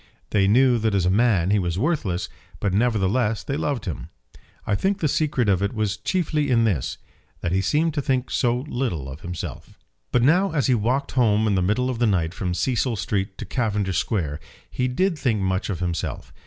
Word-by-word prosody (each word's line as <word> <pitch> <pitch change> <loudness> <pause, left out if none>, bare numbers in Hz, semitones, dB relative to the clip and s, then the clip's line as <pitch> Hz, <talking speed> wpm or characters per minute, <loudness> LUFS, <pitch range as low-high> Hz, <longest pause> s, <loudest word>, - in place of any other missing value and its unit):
They 100 -2 +3
knew 125 +3 +4
that 110 -2 0
as 95 -3 +2
a 90 - +3
man 100 -4 +3
he 105 - +3
was 85 -2 -2
worthless, 110 - -1 0.3
but 100 -3 -1
nevertheless 110 0 +1
they 140 - -3
loved 140 -6 -2
him. 85 - -5 0.6
I 105 - 0
think 195 - +1
the 160 - 0
secret 145 -5 +1
of 100 -2 +2
it 100 +3 0
was 105 -2 0
chiefly 150 - -1
in 115 -2 +3
this, 95 - 0 0.4
that 85 - -2
he 95 +1 +2
seemed 150 - +1
to 145 - -1
think 130 -1 -1
so 125 0 +1
little 120 - -3
of 70 +4 -9
himself. 90 -2 -7 0.3
But 125 - +3
now 175 +6 +3
as 145 -4 +1
he 130 - +3
walked 125 +5 0
home 110 -4 +3
in 105 - +2
the 95 - +2
middle 105 +8 +1
of 120 - -5
the 120 - +3
night 85 -5 +1
from 90 -2 -3
Cecil 120 +5 0
Street 95 0 -2
to - - -6
Cavendish 105 -7 0
Square 80 -9 -2 0.3
he 125 - 0
did 165 +6 0
think 115 -6 +1
much 95 +1 -1
of 90 -3 -3
himself. 85 -2 -3
110 Hz, 210 wpm, -23 LUFS, 95-130 Hz, 0.6 s, knew